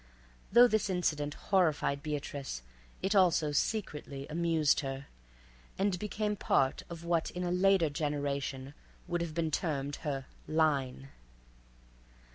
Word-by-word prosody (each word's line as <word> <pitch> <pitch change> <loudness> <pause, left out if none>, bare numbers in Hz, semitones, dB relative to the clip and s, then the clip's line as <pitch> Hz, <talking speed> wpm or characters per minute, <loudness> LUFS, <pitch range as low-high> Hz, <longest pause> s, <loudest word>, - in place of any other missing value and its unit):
Though 240 +4 +8
this 220 -3 +1
incident 150 -5 0
horrified 155 -7 +1
Beatrice, 145 - -4 0.4
it 195 +2 +1
also 175 -6 +4
secretly 145 -5 -2
amused 165 -2 +2
her 135 -1 -4 0.7
and 195 -2 +1
became 210 +1 -1
part 135 -8 +1
of 170 -1 -8
what 170 -1 +1
in 180 - -4
a 175 - -1
later 185 -1 +4
generation 140 -2 -2 0.3
would 175 -1 -1
have 165 -2 -4
been 165 -2 0
termed 145 -4 -1
her 135 -3 -3 0.2
"line." 140 -4 +1
155 Hz, 120 wpm, -32 LUFS, 140-180 Hz, 0.7 s, Though